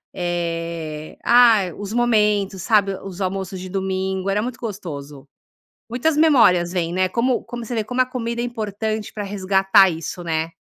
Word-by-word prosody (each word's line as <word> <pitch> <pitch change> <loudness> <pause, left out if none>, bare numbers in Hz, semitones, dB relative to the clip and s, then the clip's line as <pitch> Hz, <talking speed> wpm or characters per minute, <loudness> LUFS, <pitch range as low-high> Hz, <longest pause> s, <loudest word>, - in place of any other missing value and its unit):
eh, 165 -3 -4
ah, 235 -2 +6 0.2
os 205 +1 -6
momentos, 210 -5 +1
sabe, 200 -3 +2
os 195 0 -8
almoços 190 0 -3
de 185 +1 -7
domingo 190 0 -2
era 205 +1 +1
muito 245 +2 -4
gostoso. 150 - -7 0.6
Muitas 270 +6 0
memórias 230 - +4
vêm, 170 -2 -1
né, 185 +1 +2
como 240 +5 0
como 240 -1 -7
você 235 +2 -5
vê, 220 - 0
como 245 +4 0
a - - +3
comida 235 -2 -3
é - - -1
importante 220 -2 -4
para 210 - -4
resgatar 195 0 +3
isso, 165 +2 -6
né? 160 -1 -1
195 Hz, 165 wpm, -21 LUFS, 180-230 Hz, 0.6 s, ah